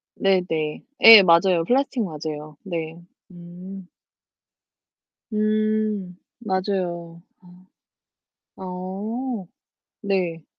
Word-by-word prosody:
네네. 175 -6 -1 0.2
예, 225 -3 +11
맞아요. 170 0 +4
플라스틱 265 +1 0
맞아요. 155 -3 -7
네. 165 -4 -5 0.4
음. 180 +2 -11 1.5
음, 215 -3 -1 0.2
맞아요. 185 -5 -3 1.4
아. - - -12
어, 195 +5 -5 0.6
네. 180 -5 -2
185 Hz, 125 characters per minute, -22 LUFS, 170-210 Hz, 1.5 s, 예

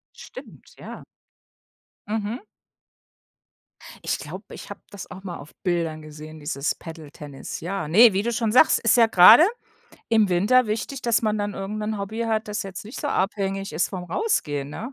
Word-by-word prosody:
Stimmt, - - -13
ja. - - -10 1.0
Mhm. 215 +2 -3 1.7
Ich - - -1
glaube, - - -9
ich - - -11
habe - - -8
das 200 -3 -10
auch 190 - -10
mal 175 -3 -6
auf 145 +2 -13
Bildern 165 -4 -1
gesehen, 155 +1 -11
dieses 145 -1 -2
Paddle-Tennis, 150 -4 -9
ja, 180 -1 -4
ne, 215 +7 +7
wie 195 - 0
du 235 +2 -2
schon 225 -2 -1
sagst, 255 - +5
ist 230 - +3
ja 230 -1 +6
grade 220 - +8 0.6
im 220 -3 +3
Winter 210 +8 +3
wichtig, 225 +5 -4
dass 235 -1 +2
man 215 -1 0
dann 205 0 -3
irgend 195 +2 -5
'nen 215 0 -3
Hobby 205 +3 -5
hat, 220 -1 -1
das 210 +1 -3
jetzt 195 0 -8
nicht 220 - -8
so 290 - -2
abhängig 195 - -2
ist 155 +3 0
vom 180 -2 -6
Rausgehen, 150 - -2
ne? 235 - -7
200 Hz, 175 wpm, -23 LUFS, 170-220 Hz, 1.7 s, grade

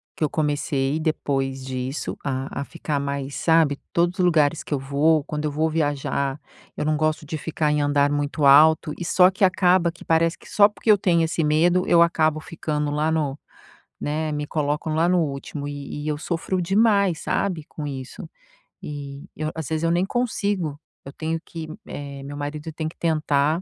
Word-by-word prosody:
que - - -3
eu 150 - +2
comecei 145 -1 0
depois 135 -4 -1
disso, 130 +2 -4
a 135 0 -3
a - - -2
ficar 145 -3 -3
mais, 140 0 -4
sabe, 160 -4 +3
todos 175 +2 +1
os 180 - +4
lugares 160 -2 +2
que - - -4
eu 140 - 0
vou, 145 +3 +2
quando 150 -1 -4
eu 150 - -1
vou 160 +2 0
viajar, 145 -2 -1 0.4
eu - - -2
não 155 0 +1
gosto 155 0 0
de 155 - -3
ficar 155 -1 -1
em 150 0 +1
andar 145 0 +2
muito 145 +1 -1
alto 155 +3 +6
e 175 - -5
só 180 +1 +5
que 195 +1 -3
acaba 180 -2 +3
que 175 - -15
parece 165 +1 +2
que - - -16
só 205 -1 +6
porque 215 +1 +1
eu 205 - +6
tenho 170 -3 +2
esse 160 0 0
medo, 170 +4 +3
eu 170 -1 +5
acabo 160 -2 +3
ficando 150 -2 -3
lá 155 +2 0
no 150 -3 -1 0.6
né, 155 +1 -2
me 150 0 -2
colocam 150 +1 -1
lá 165 +2 +3
no 180 -1 +3
último 145 -1 -4
e 145 0 -6
e - - -3
eu 150 - -1
sofro 175 +3 -2
demais, 200 -2 +3
sabe, 175 -6 -1
com 150 -2 -6
isso 130 -2 -7 0.5
e 140 -1 -7
eu 155 0 -2
às 160 -3 -4
vezes 160 +1 -1
eu 165 - +2
nem 175 +2 +2
consigo. 200 - -1 0.3
Eu 140 - -9
tenho 160 +2 -3
que, 160 -2 -7 0.2
eh, 140 -1 -7
meu 145 +1 -7
marido 150 +2 -5
tem 155 0 -3
que 160 - -9
tentar, 155 0 +1
155 Hz, 195 wpm, -23 LUFS, 145-165 Hz, 0.6 s, alto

